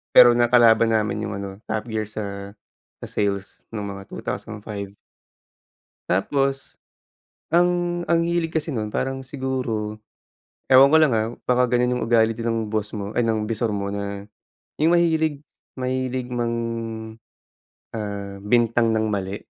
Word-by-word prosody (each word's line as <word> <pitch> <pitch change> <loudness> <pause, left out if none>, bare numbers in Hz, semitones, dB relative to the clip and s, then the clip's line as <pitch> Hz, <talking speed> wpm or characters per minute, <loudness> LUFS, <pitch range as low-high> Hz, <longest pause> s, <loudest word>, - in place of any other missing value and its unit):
Pero 120 -1 +10
nakalaban 120 -1 +5
namin 105 -1 0
yung 110 -1 -3
ano, 100 0 -5 0.2
Top 110 +2 -2
Gear 110 -2 -3
sa 100 -1 -6 0.4
sa - - -8
sales 100 -1 -2
nung 105 -2 -5
mga 100 -1 -8
2005. 100 -1 -6 1.1
Tapos 135 +9 0 0.7
ang 175 0 +2
ang 170 0 +3
hilig 170 -1 0
kasi 160 0 -1
nun 110 -5 -2
parang 135 0 -1
siguro 125 -6 -3 0.7
ewan 130 +1 +9
ko 155 +3 +5
lang 155 -4 +4
ah, 110 -1 +1 0.2
baka 125 0 +3
ganyan 125 0 +1
yung - - -2
ugal 115 -1 +5
din 115 +1 -4
ng 115 -1 +1
boss 110 0 -1
mo 100 0 -4
ay 120 +1 +1
ng 110 -1 +1
bisor 110 0 -1
mo 100 0 -3
na 100 0 -4 0.5
yung 160 +2 +3
mahilig 160 -4 +2 0.4
mahilig 130 0 -2
mang, 120 -1 -1 1.4
ah, 100 -2 -5
bintang 115 +1 +3
ng 110 0 +1
mali. 95 0 -2
115 Hz, 140 wpm, -23 LUFS, 105-130 Hz, 1.4 s, Pero